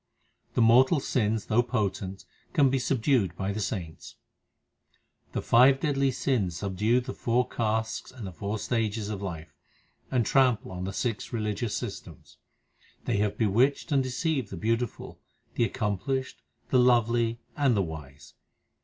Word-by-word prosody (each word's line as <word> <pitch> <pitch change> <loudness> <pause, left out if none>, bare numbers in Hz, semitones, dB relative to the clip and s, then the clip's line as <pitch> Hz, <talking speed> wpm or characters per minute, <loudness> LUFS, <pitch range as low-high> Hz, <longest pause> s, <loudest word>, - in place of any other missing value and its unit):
The 120 - +4
mortal 130 +7 +5
sins, 110 -5 0
though 115 +1 +3
potent, 100 -5 -3 0.3
can 140 -6 +4
be 135 - +1
subdued 120 - +1
by 95 0 -2
the 110 - -4
saints: 90 -6 -5 1.2
The - - -2
five 130 +3 +6
deadly 140 -3 +1
sins 120 -9 -1
subdue 105 +6 +1
the 130 +1 -6
four 125 +1 0
castes 110 -1 -2
and 125 -5 -9
the 95 - -6
four 100 +6 -4
stages 110 -1 -1
of 100 -2 -4
life, 85 -5 -6 0.6
and 125 -3 +1
trample 125 -7 +2
on 90 0 -5
the 95 - -3
six 115 +2 -3
religious 105 -1 -2
systems. - - -8 0.7
They - - 0
have 105 0 0
bewitched 120 - +2
and 140 -2 +4
deceived 130 -1 -1
the 95 - -7
beautiful, 115 +5 -2 0.3
the 120 - +2
accomplished, 120 +4 -2 0.3
the 130 - +5
lovely, 120 -1 +3 0.2
and 135 -6 +2
the 100 - +2
wise. 75 -3 -9
115 Hz, 145 wpm, -28 LUFS, 100-125 Hz, 1.2 s, five